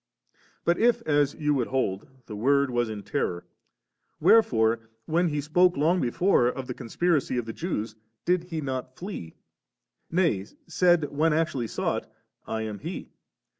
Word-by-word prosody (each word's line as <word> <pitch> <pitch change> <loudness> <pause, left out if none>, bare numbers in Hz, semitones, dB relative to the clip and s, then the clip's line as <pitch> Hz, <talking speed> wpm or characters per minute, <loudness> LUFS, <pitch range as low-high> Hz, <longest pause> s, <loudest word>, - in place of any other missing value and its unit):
But 170 +1 +2
if, 235 0 +3
as 145 -3 +2
you 150 -1 +1
would 130 -4 0
hold, 105 -7 -1 0.2
the 105 - -7
Word 140 +5 +2
was 120 -1 0
in 105 -2 -6
terror, 90 -11 -2 0.7
wherefore, 115 - +4 0.2
when 170 +2 +2
He 150 -2 -1
spoke 175 +4 +3
long 165 +5 +2
before 125 +1 +3
of 130 +1 -3
the 125 - -4
conspiracy 145 +3 0
of 120 - -1
the 115 - -5
Jews, 115 - -3 0.3
did 180 -1 +2
He 165 -3 -4
not 130 -2 -4
flee, 175 - -7 0.7
nay 160 - +1 0.2
said 170 -2 +2
when 160 +2 +3
actually 150 -7 0
sought, - - -2 0.2
' - - -52
I 110 0 -2
am 105 -2 -5
He - - -6
140 Hz, 160 wpm, -27 LUFS, 115-170 Hz, 0.7 s, wherefore